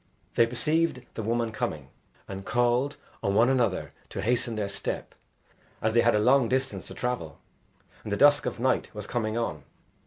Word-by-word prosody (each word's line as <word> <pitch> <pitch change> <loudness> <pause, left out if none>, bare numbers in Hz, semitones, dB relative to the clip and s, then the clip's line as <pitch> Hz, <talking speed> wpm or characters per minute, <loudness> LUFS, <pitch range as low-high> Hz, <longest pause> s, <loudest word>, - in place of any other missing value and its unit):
They 115 - +4
perceived 140 +3 0
the - - -4
woman 115 +1 0
coming, 75 -10 -3 0.4
and 95 0 -6
called 120 +6 +1 0.2
on 100 - 0
one 115 +4 +5
another 120 -8 +1 0.2
to - - -4
hasten 115 0 +1
their 105 -2 -1
step 100 - -4 0.7
as 110 0 0
they 120 - +5
had 120 -1 +4
a - - +3
long 125 +2 +4
distance 130 +1 -1
to - - -9
travel, 120 - -3 0.7
and 105 - -6
the 100 - +1
dusk 145 +3 +5
of - - -4
night 130 +1 +1
was 105 -1 -5
coming 110 -1 -2
on. 80 -11 -2
115 Hz, 180 wpm, -27 LUFS, 105-125 Hz, 0.7 s, one